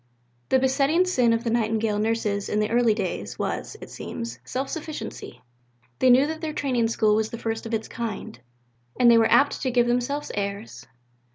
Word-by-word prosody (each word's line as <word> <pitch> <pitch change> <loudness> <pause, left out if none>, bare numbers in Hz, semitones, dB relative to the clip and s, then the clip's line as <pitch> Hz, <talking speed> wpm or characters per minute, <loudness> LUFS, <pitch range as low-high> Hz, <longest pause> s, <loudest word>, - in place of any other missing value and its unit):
The 265 - +4
besetting 275 +6 +2
sin 250 -10 +2
of 230 0 0
the 230 - -1
Nightingale 220 -2 0
Nurses 210 -2 -1
in 210 - 0
the 210 +1 0
early 235 -2 +3
days 175 - -4
was, - - -4
it - - -10
seems, 115 +1 -6
self 265 +2 -3
sufficiency. 300 - -7 0.6
They 260 - +4
knew 255 +3 +6
that 315 +1 -5
their 315 -2 -3
Training 250 -6 0
School 220 -2 +2
was 220 0 +1
the 230 - -6
first 225 0 -4
of 230 - -7
its 220 0 -4
kind; 220 - -6 0.6
and 240 -1 +7
they 230 - +6
were 225 - +3
apt 285 - +4
to 260 - 0
give 240 -1 +3
themselves 250 +5 -1
airs. 200 +2 -5
230 Hz, 190 wpm, -25 LUFS, 215-260 Hz, 0.6 s, and